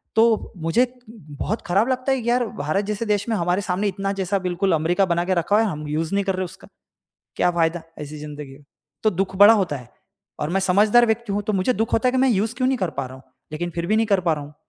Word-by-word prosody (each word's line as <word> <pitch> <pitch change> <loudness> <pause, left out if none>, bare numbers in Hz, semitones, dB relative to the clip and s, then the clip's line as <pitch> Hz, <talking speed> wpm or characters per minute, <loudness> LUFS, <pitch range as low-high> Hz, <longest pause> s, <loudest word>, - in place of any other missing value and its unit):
तो 225 -1 +2
मुझे 165 +9 +2 0.2
बहुत 205 0 -5
खराब 200 +6 +2
लगता 255 +1 0
है 265 - +2
यार 245 +1 +2
भारत 155 +8 -1
जैसे 210 +2 -3
देश 205 -1 0
में 225 - +1
हमारे 180 0 0
सामने 190 +2 -1
इतना 195 0 -2
जैसा 195 +1 0
बिल्कुल 185 +1 -1
अमेरिका 170 +5 +2
बना 170 -1 0
के 185 - +1
रखा 175 +3 +1
हुआ 225 +1 +4
है, - - 0
हम 150 -1 -6
यूज़ 155 +4 -2
नहीं 200 - +1
कर 195 -1 0
रहे 185 0 -2
उसका। 185 +2 -13 0.7
क्या 180 - +3
फायदा 170 -1 0 0.2
ऐसी 150 0 -7
जिंदगी 150 -2 -8 0.5
तो 215 - +3
दुःख 190 0 -2
बड़ा 205 +3 +9
होता 185 -9 0
है। 125 -3 -12 0.5
और 150 +1 -2
मैं 195 +2 +1
समझदार 210 +6 +4
व्यक्ति 225 -1 -1
हूँ 205 +1 -1
तो 215 - -2
मुझे 195 +5 +1
दुःख 225 0 -2
होता 240 +3 +2
है - - 0
कि 260 - +1
मैं 265 +1 +4
यूज़ 220 +1 0
क्यों 255 0 0
नहीं 265 -1 0
कर 185 -5 -1
पा 135 - -1
रहा 130 - -11
हूँ। 130 - -15 0.3
लेकिन 175 +3 -3
फ़िर 170 0 -2
भी 215 +4 +2
नहीं 225 0 +2
कर 200 -3 +2
पा 170 -2 +1
रहा 150 -2 -4
हूँ। 145 +1 -13
190 Hz, 260 wpm, -22 LUFS, 170-220 Hz, 0.7 s, बड़ा